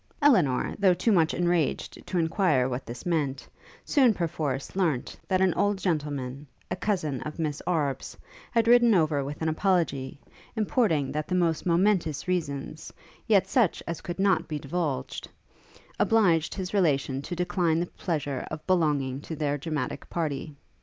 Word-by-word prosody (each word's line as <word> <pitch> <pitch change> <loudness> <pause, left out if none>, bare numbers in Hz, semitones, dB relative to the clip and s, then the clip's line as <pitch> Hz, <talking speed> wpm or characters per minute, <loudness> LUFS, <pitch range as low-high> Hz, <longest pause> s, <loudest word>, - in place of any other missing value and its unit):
Elinor, 185 - +3
though 190 -3 +5
too 200 +6 +1
much 165 -5 +4
enraged 175 -3 -1
to 185 - -2
inquire 160 -5 +2
what 130 -1 -4
this 120 +1 -8
meant, 145 -6 -1 0.4
soon, 255 -7 +4
perforce, 155 -6 -3
learnt, 165 -10 0
that 185 -1 +1
an 190 -2 +3
old 205 0 +1
gentleman, 145 -6 -3 0.2
a - - +1
cousin 155 -10 -1
of 150 - -6
Miss 155 -3 -2
Arbe's, 145 -6 -1 0.3
had 230 -1 +1
ridden 240 -2 +6
over 155 -5 +2
with 145 +3 -5
an - - 0
apology, 155 -7 0 0.4
importing, 210 - +1
that 150 0 -3
the 180 - -1
most 170 -2 +1
momentous 175 -4 +1
reasons, 155 -4 -3 0.4
yet 205 -4 +4
such 240 - +1
as 170 -2 -4
could 175 - -5
not 195 -1 +2
be 155 - -3
divulged, 140 -3 -3 0.7
obliged 175 -8 +3
his 190 -1 -5
relation 140 -8 +1
to 175 - -5
decline 175 -2 +1
the 175 - 0
pleasure 150 -7 -3
of 155 0 -7
belonging 145 -7 +1
to 160 - -6
their 145 -2 -1
dramatic 145 -2 -4
party. 155 -2 -3
165 Hz, 155 wpm, -27 LUFS, 145-185 Hz, 0.7 s, ridden